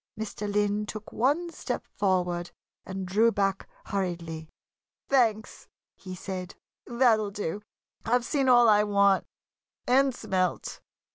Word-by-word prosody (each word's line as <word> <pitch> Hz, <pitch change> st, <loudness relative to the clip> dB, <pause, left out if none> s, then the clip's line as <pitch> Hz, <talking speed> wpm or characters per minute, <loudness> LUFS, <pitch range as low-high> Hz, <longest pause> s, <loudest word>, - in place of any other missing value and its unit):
Mr. 210 Hz, -1 st, -4 dB
Lynn 205 Hz, +1 st, 0 dB
took 215 Hz, 0 st, -7 dB
one 295 Hz, +9 st, +1 dB
step -, -, -4 dB
forward 180 Hz, -3 st, 0 dB, 0.4 s
and 190 Hz, 0 st, -4 dB
drew 215 Hz, +6 st, +3 dB
back 195 Hz, -2 st, -1 dB, 0.2 s
hurriedly. 170 Hz, -5 st, -4 dB, 0.6 s
"Thanks!" 225 Hz, -5 st, +1 dB, 0.3 s
he 185 Hz, -1 st, -9 dB
said. 185 Hz, -1 st, -6 dB, 0.3 s
"That'll 235 Hz, -4 st, +3 dB
do! 200 Hz, -1 st, -4 dB, 0.4 s
I've 245 Hz, +1 st, +1 dB
seen 275 Hz, -1 st, +1 dB
all 240 Hz, -1 st, +7 dB
I 210 Hz, -1 st, +5 dB
want 200 Hz, -2 st, +3 dB, 0.6 s
and 270 Hz, +2 st, +4 dB
smelt!" 185 Hz, -6 st, -2 dB
205 Hz, 120 wpm, -27 LUFS, 185-230 Hz, 0.6 s, all